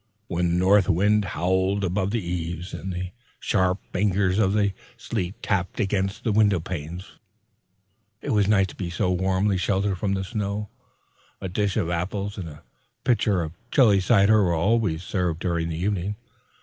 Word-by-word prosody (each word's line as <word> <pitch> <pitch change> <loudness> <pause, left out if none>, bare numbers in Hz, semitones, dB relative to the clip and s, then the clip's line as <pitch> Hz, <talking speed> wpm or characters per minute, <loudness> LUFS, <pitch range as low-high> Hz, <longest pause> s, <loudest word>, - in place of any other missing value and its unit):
When 85 -3 0
the - - +2
north 95 +2 +4
wind 105 +4 +3
howled 95 +3 0
about 95 +1 0
the 110 -3 -2
eaves, 85 0 -4
and 95 - -5
the 90 0 -4 0.3
sharp 95 -3 +1 0.2
fingers 95 0 +1
of 100 -2 +3
the 100 -2 +2 0.2
sleet 105 -5 -3
tapped 95 -3 -1
against 95 -2 -1
the 115 - +1
window 105 -3 +4
panes, 85 +1 -7 1.0
it - - -4
was 105 -3 +3
nice 100 -2 +4
to - - -11
be 90 -3 -4
so 90 +1 0
warmly 95 +2 +1
sheltered 95 +1 0
from 100 0 0
the 95 - -2
storm. 105 0 -3 0.7
A - - -4
dish 100 +1 -1
of 85 - 0
apples 100 +4 -3
and 85 -3 -5
a 75 +1 -13 0.4
pitcher 105 -7 +2
of 80 - -5 0.2
chilly 110 -9 +5
cider 105 +1 +4
were 85 -3 +2
always 95 -2 +1
served 90 -4 -1
during 85 -2 -1
the 80 - -3
evening. 100 +2 -1
95 Hz, 170 wpm, -25 LUFS, 90-105 Hz, 1.0 s, chilly